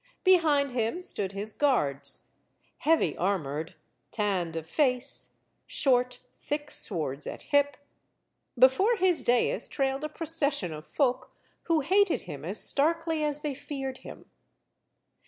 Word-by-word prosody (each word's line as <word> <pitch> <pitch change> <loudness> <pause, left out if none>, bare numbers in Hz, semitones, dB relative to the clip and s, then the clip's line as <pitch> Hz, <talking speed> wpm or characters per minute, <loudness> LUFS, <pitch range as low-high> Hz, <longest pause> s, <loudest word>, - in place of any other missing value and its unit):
Behind 310 -7 +4
him 245 +9 -2
stood 195 - -1
his 205 +2 -4
guards; 205 - 0 0.5
heavy 325 +1 +2
armored, 165 -5 -2 0.3
tanned 190 -6 -1
of 160 -1 -5
face; 260 - -1 0.3
short, 250 -2 +1 0.2
thick 295 0 -4
swords 150 -7 -3
at - - -6
hip. 285 -1 +2 0.8
Before 265 - +5
his 370 -4 +2
dais 245 - +1
trailed 270 0 -1
a 305 - -2
procession 295 - -1
of 155 0 -9
folk 255 -4 -1 0.3
who 330 -2 +2
hated 385 +6 +2
him - - -8
as - - +1
starkly 325 +2 +2
as 295 0 0
they 295 -2 -2
feared 270 -1 -6
him. - - -11
275 Hz, 125 wpm, -28 LUFS, 205-305 Hz, 0.8 s, Before